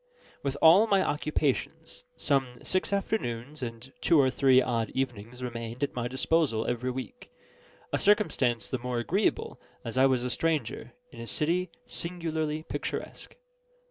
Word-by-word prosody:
With 140 -1 -2
all 180 +8 +8
my 195 -3 +3
occupations, 155 - -2
some 135 -4 0
six 185 - 0
afternoons 150 - -2
and 120 +1 -6
two 165 - +5
or 130 -2 +4
three 130 0 +5
odd 115 -3 0
evenings 125 -1 -3
remained 115 +1 -5
at 140 - -1
my 120 -1 -2
disposal 130 -2 +1
every 120 +1 -1
week: 130 - -7 0.6
a - - +2
circumstance 130 - +2
the 130 - -3
more 125 0 -3
agreeable 185 - 0 0.2
as 115 +2 -2
I 135 - +7
was 130 -2 +1
a 125 - -1
stranger 165 0 -1 0.2
in - - -12
a 115 - -7
city 175 +7 0 0.2
singularly 160 -3 -2
picturesque. - - -5
130 Hz, 145 wpm, -29 LUFS, 120-165 Hz, 0.6 s, all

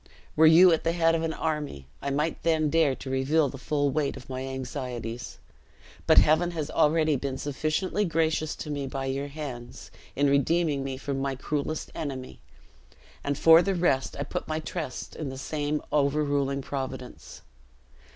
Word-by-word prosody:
"Were 160 +1 +7
you 170 +2 +8
at 160 - 0
the 165 - +1
head 165 -1 +3
of 165 - +1
an 165 0 -1
army, 150 - -3 0.2
I 140 - -2
might 150 +4 -1
then 155 -3 +1
dare 160 -5 +3
to 130 - -8
reveal 140 +3 +2
the 135 - -9
full 145 +1 0
weight 145 -1 -1
of 135 0 -11
my 130 0 -4
anxieties; 125 -3 -5 0.7
but - - +5
Heaven 160 +3 +5
has 155 -1 -3
already 155 0 +3
been 135 0 -3
sufficiently 155 +8 -1
gracious 160 -3 0
to 150 - -6
me 140 -2 -3
by 135 0 -4
your 135 +1 -2
hands, 140 -5 -8 0.2
in 140 +1 +2
redeeming 140 +1 +2
me 135 -1 -4
from 135 0 -3
my 135 0 -1
cruelest 150 +3 -3
enemy; 135 -4 -6 0.8
and 145 -1 -1
for 165 +2 +7
the 195 +1 0
rest, 140 -7 +1
I 140 - -2
put 145 - -5
my 155 0 -2
trust 155 -4 -5
in 155 -4 -4
the 130 - -7
same 150 +2 -2
overruling 140 -1 +1
Providence." 130 -2 -6
145 Hz, 170 wpm, -27 LUFS, 135-160 Hz, 0.8 s, you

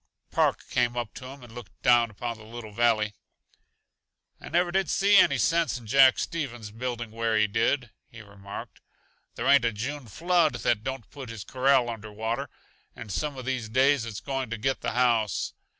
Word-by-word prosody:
Park - - +1
came 120 -1 0
up 120 -3 -3
to 130 - -9
him 135 0 -11
and 120 -2 -13
looked 120 -7 -11
down 120 -1 +5
upon 115 +2 -5
the - - -12
little 110 0 -9
valley. 110 -1 +2 1.3
"I - - -10
never 175 +1 +2
did 190 +1 0
see 200 +1 +3
any 140 -7 +5
sense 165 +5 +1
in 120 - -12
Jack 130 +3 +6
Stevens 120 -10 -4
building 120 0 -4
where 115 0 0
he 105 - +4
did," 115 +3 0 0.2
he 115 -2 -12
remarked. 100 -1 -10 0.5
"There - - -4
ain't 140 -3 +6
a 115 - +2
June 130 +5 -5
flood 165 - +2
that 120 -3 0
don't 130 -3 -5
put 135 -4 -9
his 115 -3 -7
corral 130 +2 +2
under 110 -2 -6
water, 110 +2 -3 0.5
and 110 -3 -8
some 145 +6 -2
uh 130 - -6
these 125 -3 -3
days 135 +2 +3
it's 110 -4 -6
going 135 -3 -3
to 115 - -3
get 135 +5 -1
the - - -2
house. 120 -3 +1
120 Hz, 190 wpm, -27 LUFS, 110-135 Hz, 1.3 s, Jack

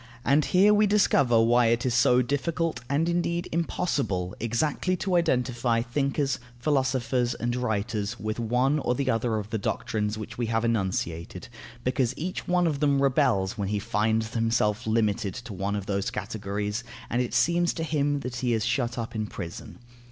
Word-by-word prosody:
And 145 +2 +4
here 200 +3 +5
we 210 0 +4
discover 140 - +4
why 120 +1 +4
it 115 +2 +1
is 125 - +1
so 125 +1 +4
difficult, 160 +5 -1
and 150 +4 +1
indeed 170 0 0
impossible, 140 - -1
exactly 145 +10 0
to 190 -2 -1
identify 125 -7 +1
thinkers, 135 +2 -1 0.2
philosophers, 130 -2 0
and 120 +1 -2
writers 110 -3 -2
with 110 +1 -3
one 125 +6 +1
or 125 -3 0
the 135 0 0
other 115 0 0
of 105 0 -5
the 110 - -1
doctrines 105 +1 -2
which 110 +2 -8
we 120 - 0
have 115 0 0
enunciated, 95 -5 -2 0.3
because 125 -1 0
each 180 +4 -4
one 180 0 +2
of 150 -4 0
them 140 -2 +2
rebels 110 -6 +2
when 100 - -1
he 105 +1 -1
finds 110 +2 0
himself 115 -2 +1
limited 110 -3 0
to 120 -3 -7
one 100 +2 -2
of 100 -2 -4
those 100 +3 -1
categories, 105 -2 -3 0.2
and 120 - 0
it 120 -1 -3
seems 170 +7 +3
to 165 - -3
him 145 -2 0
that 125 -2 -5
he 120 -1 0
is 110 -1 0
shut 120 0 -1
up 115 -1 -4
in 110 -1 -2
prison. 85 -5 -8
120 Hz, 175 wpm, -26 LUFS, 110-140 Hz, 0.3 s, here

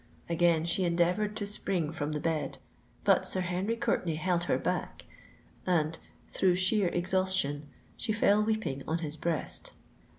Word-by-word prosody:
Again 170 -1 +3
she 170 +3 +1
endeavoured 180 +5 +1
to 205 - -2
spring 185 -6 -1
from 155 -2 -3
the 150 - -1
bed; 155 -3 -1 0.5
but - - +4
Sir 185 - 0
Henry 185 +5 -1
Courtenay 170 -7 0
held 175 +2 0
her - - +2
back—and, 165 -3 -3 0.3
through 185 -2 +2
sheer 190 +2 +3
exhaustion, 175 -5 0 0.3
she 225 - -2
fell 210 -1 +4
weeping 215 -11 -1
on 160 - +1
his 155 -3 -4
breast. 160 0 -3
175 Hz, 140 wpm, -30 LUFS, 160-190 Hz, 0.5 s, but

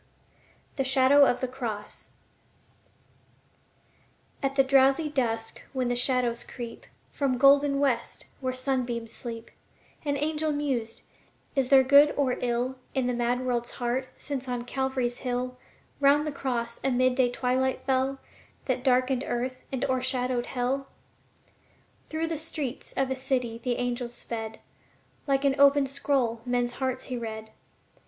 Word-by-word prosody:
The 270 - +2
Shadow 270 +2 +6
of 245 - 0
the 255 - 0
Cross 235 -5 -5 2.3
At 275 0 -1
the 270 - +5
drowsy 270 +3 +4
dusk 230 -5 -1
when 255 -2 0
the 245 - +1
shadows 245 -2 +1
creep 235 -2 -8 0.2
From 275 -3 0
the - - -1
golden 275 +1 +5
west, 260 -5 0
where 260 -1 -1
the 255 - -5
sunbeams 245 -4 -2
sleep, 230 -1 -7 0.5
An 285 -2 0
angel 305 +1 0
mused: 265 -6 -2 0.5
"Is 265 -2 +1
there 270 -1 +7
good 285 +3 +6
or 265 -3 +2
ill 250 +2 -1 0.2
In 265 -2 +1
the 250 - 0
mad 245 +1 0
world's 240 -1 -1
heart, 250 +2 -2
since 270 -3 -5
on 245 -1 -2
Calvary's 260 -1 -1
hill 250 0 -3 0.4
'Round 285 +1 +4
the 305 - -2
cross 240 -4 -3
a 270 - +2
mid 255 0 +3
day 250 -1 +3
twilight 255 +1 0
fell 265 0 +1 0.5
That 255 -1 -1
darkened 255 0 +2
earth 255 +1 -2
and 265 -2 -1
o'ershadowed 255 -1 0
hell?" 265 +2 -1 1.2
Through 320 +1 -2
the 325 -2 -3
streets 300 -5 -5
of 270 -1 0
a - - +1
city 250 -3 -1
the 250 -2 0
angel 245 0 -2
sped; 225 -2 -6 0.7
Like 275 0 +2
an 275 - +4
open 280 0 +6
scroll 265 -4 0
men's 245 0 0
hearts 260 0 -2
he 255 - -4
read. 220 -1 -6
255 Hz, 145 wpm, -27 LUFS, 245-275 Hz, 2.3 s, there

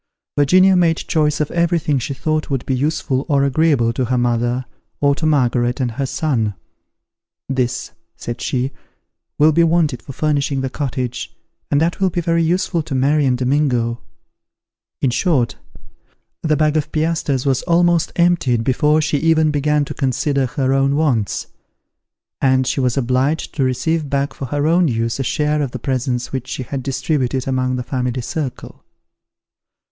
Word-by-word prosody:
Virginia 185 +7 +5
made 170 -2 +3
choice 150 -2 0
of 150 - -1
everything 170 -4 +1
she 135 +3 -4
thought 155 +3 -1
would 135 -3 -2
be 135 - -1
useful 135 -1 -1
or 140 -2 +3
agreeable 140 -4 +2
to 130 - -1
her 125 +2 0
mother, 120 +1 0 0.3
or 140 0 +3
to 155 +2 -1
Margaret 125 -4 +1
and 125 -3 0
her 135 +4 -3
son. 125 - -1 0.9
"This," 130 -2 -2 0.2
said 120 0 -6
she, 130 +1 -1 0.7
"will 155 +2 +5
be 170 +2 +3
wanted 165 -6 +1
for 140 - -9
furnishing 140 -1 0
the 130 -1 -3
cottage, 125 -3 -4 0.3
and 145 - +2
that 165 +3 0
will 190 -1 +2
be 175 - -2
very 170 0 +1
useful 175 +1 0
to 150 -3 -5
Mary 140 +2 +2
and 125 -1 +2
Domingo." 125 -3 0 1.0
In 130 - +3
short, 125 -2 +1 0.9
the 155 -2 +1
bag 155 -1 +2
of 150 -1 -2
piastres 155 -4 0
was 135 -2 +1
almost 175 -1 +3
emptied 170 -10 +2
before 150 +5 +2
she 150 -1 0
even 160 0 +3
began 150 0 +1
to 150 - -6
consider 135 0 0
her 135 -1 0
own 135 +1 +2
wants; 130 -9 0 1.0
and 130 -1 +3
she 130 - -1
was 125 -1 0
obliged 130 +4 0
to 140 - 0
receive 145 +4 0
back 140 0 -1
for 135 - -6
her 145 +3 -1
own 170 +2 +3
use 115 -1 -1
a - - 0
share 150 +4 0
of 140 - -1
the 125 - -6
presents 125 0 -2
which 130 -1 -3
she 130 - -4
had 135 +2 -4
distributed 135 -1 -1
among 130 -1 0
the 125 - -3
family 125 0 -2
circle. 135 +1 -5
140 Hz, 165 wpm, -19 LUFS, 125-155 Hz, 1.0 s, Virginia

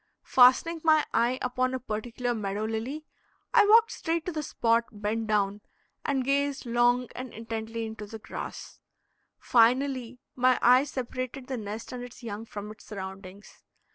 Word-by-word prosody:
Fastening 260 +7 +5
my 310 -1 +5
eye 240 +2 +2
upon 255 +1 0
a - - -3
particular 240 +2 -3
meadow 210 -1 -3
lily, 235 +8 -4 0.5
I 410 - +6
walked 455 +2 +6
straight 330 -1 -2
to 360 - -2
the 310 -2 -3
spot, 230 -4 +1
bent 215 +1 -3
down, 205 -1 +1 0.4
and 270 -2 0
gazed 280 +1 0
long 240 +1 +2
and 255 -1 -6
intently 225 0 -5
into 220 -1 -7
the 220 - -8
grass. 215 - -8 0.6
Finally 250 +1 +2 0.2
my 255 0 +4
eye 250 +3 +6
separated 255 -1 -5
the 260 -1 -4
nest 215 +1 -6
and 250 -1 -6
its 245 0 -11
young 220 -1 -5
from 210 -1 -7
its 215 - -14
surroundings. 190 0 -9
240 Hz, 155 wpm, -28 LUFS, 220-260 Hz, 0.6 s, I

